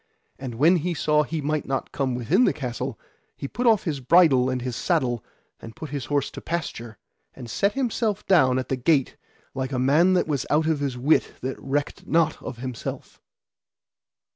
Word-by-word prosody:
And 130 Hz, -3 st, -6 dB
when 160 Hz, +9 st, +4 dB
he 170 Hz, +2 st, -2 dB
saw 150 Hz, 0 st, +2 dB
he 155 Hz, +1 st, -3 dB
might 150 Hz, 0 st, -2 dB
not 135 Hz, 0 st, -2 dB
come 130 Hz, -3 st, -1 dB
within 155 Hz, -, +2 dB
the -, -, +2 dB
castle, 125 Hz, -5 st, -4 dB, 0.4 s
he 140 Hz, -, -5 dB
put 245 Hz, -, -2 dB
off 220 Hz, -4 st, +4 dB
his 150 Hz, -5 st, -2 dB
bridle 135 Hz, -3 st, +5 dB
and 130 Hz, 0 st, -1 dB
his 125 Hz, -1 st, -4 dB
saddle, 130 Hz, -, 0 dB, 0.4 s
and 115 Hz, 0 st, -10 dB
put 155 Hz, -, -8 dB
his 140 Hz, -4 st, -4 dB
horse 145 Hz, 0 st, -1 dB
to -, -, -9 dB
pasture, 120 Hz, -, -5 dB, 0.4 s
and 120 Hz, -, -9 dB
set 200 Hz, -, 0 dB
himself 230 Hz, -5 st, -1 dB
down 130 Hz, -9 st, +4 dB
at 130 Hz, -, -3 dB
the 130 Hz, -, 0 dB
gate 135 Hz, +1 st, +1 dB, 0.4 s
like 130 Hz, 0 st, -3 dB
a 130 Hz, -, -1 dB
man 150 Hz, +9 st, +4 dB
that 180 Hz, -, +2 dB
was 145 Hz, -4 st, -2 dB
out 155 Hz, +1 st, +2 dB
of 160 Hz, -2 st, +1 dB
his 140 Hz, -3 st, -2 dB
wit 145 Hz, +6 st, +2 dB
that 130 Hz, +1 st, -4 dB
recked 145 Hz, +2 st, -3 dB
not 160 Hz, -1 st, +1 dB
of 120 Hz, -, -7 dB
himself. 125 Hz, -1 st, -7 dB
145 Hz, 190 wpm, -24 LUFS, 130-165 Hz, 0.4 s, bridle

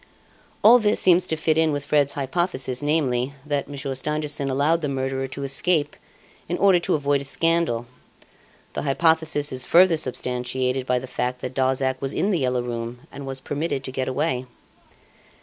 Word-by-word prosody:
"All 235 Hz, +3 st, +8 dB
this 210 Hz, -1 st, +2 dB
seems 180 Hz, 0 st, +4 dB
to 160 Hz, -, -1 dB
fit 155 Hz, 0 st, +1 dB
in 160 Hz, -1 st, +3 dB
with 145 Hz, -1 st, -3 dB
Fred's 145 Hz, -1 st, +2 dB
hypothesis, 135 Hz, -3 st, -2 dB
namely, 140 Hz, -4 st, 0 dB
that 145 Hz, -1 st, -2 dB
Monsieur 140 Hz, -1 st, -4 dB
Stangerson 150 Hz, +1 st, -2 dB
allowed 145 Hz, +5 st, +2 dB
the 150 Hz, -, -2 dB
murderer 135 Hz, 0 st, -2 dB
to 140 Hz, +1 st, -6 dB
escape 145 Hz, +2 st, +1 dB, 0.5 s
in 175 Hz, -, -1 dB
order 195 Hz, -3 st, +5 dB
to 170 Hz, -, +1 dB
avoid 145 Hz, -1 st, +1 dB
a -, -, -6 dB
scandal. 165 Hz, -5 st, +1 dB, 0.9 s
The -, -, -3 dB
hypothesis 155 Hz, 0 st, +2 dB
is 130 Hz, -1 st, -2 dB
further 175 Hz, -1 st, +5 dB
substantiated 125 Hz, -1 st, -2 dB
by 125 Hz, -, +2 dB
the 125 Hz, -, -4 dB
fact 125 Hz, 0 st, -3 dB
that 125 Hz, -, -5 dB
Darzac 130 Hz, 0 st, 0 dB
was 135 Hz, 0 st, -2 dB
in 205 Hz, -, 0 dB
"The 180 Hz, -, +1 dB
Yellow 125 Hz, -2 st, 0 dB
Room" 120 Hz, 0 st, -5 dB
and 140 Hz, -1 st, -8 dB
was 135 Hz, 0 st, -5 dB
permitted 145 Hz, -1 st, -3 dB
to 130 Hz, -, -6 dB
get 130 Hz, 0 st, -3 dB
away. 130 Hz, -2 st, -1 dB
140 Hz, 175 wpm, -23 LUFS, 130-160 Hz, 0.9 s, All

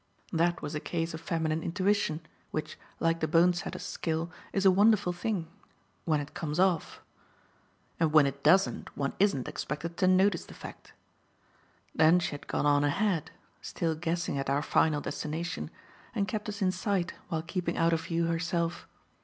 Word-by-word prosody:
That 170 Hz, +1 st, +1 dB
was 150 Hz, +1 st, -4 dB
a 150 Hz, -, -1 dB
case 165 Hz, +1 st, -3 dB
of 160 Hz, -, -6 dB
feminine 160 Hz, -1 st, -1 dB
intuition; 185 Hz, -2 st, 0 dB, 0.3 s
which, 155 Hz, -, -4 dB, 0.2 s
like 165 Hz, 0 st, +1 dB
the 160 Hz, -, 0 dB
bone 170 Hz, +3 st, +5 dB
setter's 175 Hz, -, -5 dB
skill, 165 Hz, +1 st, -2 dB, 0.2 s
is 195 Hz, 0 st, 0 dB
a 190 Hz, -, +8 dB
wonderful 205 Hz, -1 st, +4 dB
thing 175 Hz, -2 st, -2 dB, 0.6 s
when 155 Hz, -3 st, +2 dB
it 145 Hz, 0 st, -7 dB
comes 155 Hz, 0 st, -3 dB
off 185 Hz, -4 st, +1 dB, 1.0 s
(and 160 Hz, -2 st, +2 dB
when 155 Hz, -2 st, +7 dB
it 140 Hz, 0 st, -3 dB
doesn't 190 Hz, +6 st, +3 dB
one 140 Hz, -1 st, -1 dB
isn't 190 Hz, -10 st, +2 dB
expected 165 Hz, +4 st, -4 dB
to 185 Hz, -, +3 dB
notice 185 Hz, -1 st, +4 dB
the -, -, -12 dB
fact). -, -, -11 dB, 1.0 s
Then 160 Hz, +2 st, +5 dB
she 175 Hz, -, -1 dB
had 145 Hz, -, -8 dB
gone -, -, -1 dB
on 145 Hz, 0 st, +4 dB
ahead 165 Hz, +2 st, +1 dB, 0.3 s
still 165 Hz, -2 st, -2 dB
guessing 165 Hz, -2 st, -2 dB
at 135 Hz, -, -2 dB
our 140 Hz, +2 st, +1 dB
final 155 Hz, -2 st, +2 dB
destination 165 Hz, +3 st, -4 dB, 0.5 s
and 200 Hz, -3 st, +1 dB
kept 210 Hz, +1 st, -3 dB
us 205 Hz, 0 st, -3 dB
in 185 Hz, -, +3 dB
sight 185 Hz, -1 st, -1 dB, 0.2 s
while 160 Hz, -1 st, -2 dB
keeping 170 Hz, 0 st, -2 dB
out 165 Hz, 0 st, +3 dB
of 165 Hz, 0 st, -1 dB
view 170 Hz, 0 st, 0 dB
herself. 170 Hz, 0 st, -1 dB
165 Hz, 170 wpm, -30 LUFS, 155-185 Hz, 1.0 s, a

